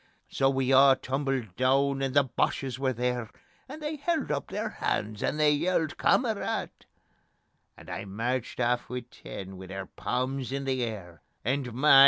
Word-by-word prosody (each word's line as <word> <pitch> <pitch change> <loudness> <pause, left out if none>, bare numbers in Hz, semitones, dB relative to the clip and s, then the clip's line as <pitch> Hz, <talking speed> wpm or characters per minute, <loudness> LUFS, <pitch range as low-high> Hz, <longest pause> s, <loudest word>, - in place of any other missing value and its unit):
So 135 - +2
we 135 0 +1
a' 135 0 +8
tumbled 135 -7 -2
doon, 135 +2 +3
and 135 0 -1
the 145 - +7
Boches 130 0 -1
were 135 -1 +1
there, 125 -2 -1 0.4
And 305 +3 -8
they 300 +1 -2
held 310 - 0
up 140 -1 -1
their - - -2
hands, 105 0 -2
and 150 - 0
they 150 -1 +5
yelled: 160 +1 +1
"Kamarad!" 225 -5 +1 1.1
And - - -14
I - - -5
merched 115 +6 -2
aff 120 0 +1
wi' 125 0 -3
ten, 95 -1 -8
wi' 95 0 -9
their 95 +1 -5
palms 130 +4 -2
in 140 0 -2
the 130 -1 0
air, 95 -8 -6 0.2
And 130 0 0
my! 135 +1 +7
130 Hz, 170 wpm, -29 LUFS, 120-140 Hz, 1.1 s, a